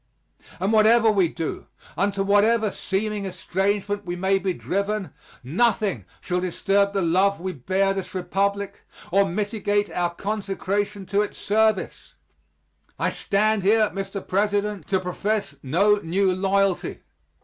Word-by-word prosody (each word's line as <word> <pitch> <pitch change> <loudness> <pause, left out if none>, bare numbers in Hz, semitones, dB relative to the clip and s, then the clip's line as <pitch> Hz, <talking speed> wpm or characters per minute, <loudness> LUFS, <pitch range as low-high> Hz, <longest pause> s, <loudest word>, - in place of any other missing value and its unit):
And 195 +4 0
whatever 220 +1 +5
we 195 -4 +3
do, 160 0 -5 0.3
into 200 +1 0
whatever 210 +2 +3
seeming 205 +1 -2
estrangement 200 +3 -1
we 175 -2 -4
may 190 +2 +1
be 190 0 -1
driven, 200 -1 -2 0.3
nothing 205 - +1 0.2
shall 180 0 -1
disturb 195 +2 +1
the 195 -2 0
love 190 +4 +2
we 185 +1 -4
bear 190 +8 0
this 195 -1 -6
Republic, 200 +2 -1 0.3
or 195 +1 +3
mitigate 205 +1 -1
our 175 -1 -1
consecration 200 0 -2
to 200 +2 +1
its 210 - -4
service. 215 -1 0 0.8
I - - 0
stand 215 +1 +1
here, 215 +2 +3
Mr. 195 0 -5
President, 205 -2 0
to 190 - +1
profess 195 -1 -2
no 195 +10 +3
new 190 +1 +1
loyalty. 195 0 0
200 Hz, 130 wpm, -24 LUFS, 185-205 Hz, 0.8 s, whatever